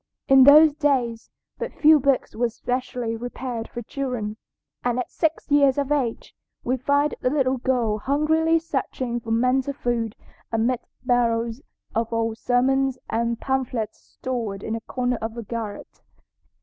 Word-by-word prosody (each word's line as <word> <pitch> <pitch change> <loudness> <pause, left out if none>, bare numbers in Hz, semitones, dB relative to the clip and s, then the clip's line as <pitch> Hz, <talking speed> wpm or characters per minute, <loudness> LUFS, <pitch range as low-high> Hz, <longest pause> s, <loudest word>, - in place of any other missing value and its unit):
In 270 -1 +7
those 300 +2 +8
days 265 -7 0 0.3
but 480 0 -4
few 310 0 +6
books 275 -1 +1
were 240 +1 +1
specially 245 0 -3
prepared 245 0 -5
for 240 - -6
children, 245 -5 -4 0.5
and 245 0 0
at 250 - -3
six 320 -2 -1
years 280 -2 +5
of 285 0 -1
age 260 -6 -1 0.3
we 255 - 0
find 285 +3 +1
the 250 - +2
little 265 -2 +1
girl 240 -4 0
hungrily 315 +6 +2
searching 265 -6 -3
for 230 - -10
mental 255 +4 +1
food 235 -4 -2 0.4
amid 230 +2 +1 0.3
barrels 235 0 +1 0.3
of 225 0 -1
old 225 -1 -1
sermons 265 +1 +2
and 235 0 0
pamphlets 255 -5 -2
stored 225 -6 -5
in 220 - -3
a 225 - -3
corner 245 0 -2
of 225 +1 -4
the 235 - -5
garret. 220 -2 -6
250 Hz, 150 wpm, -24 LUFS, 230-275 Hz, 0.5 s, those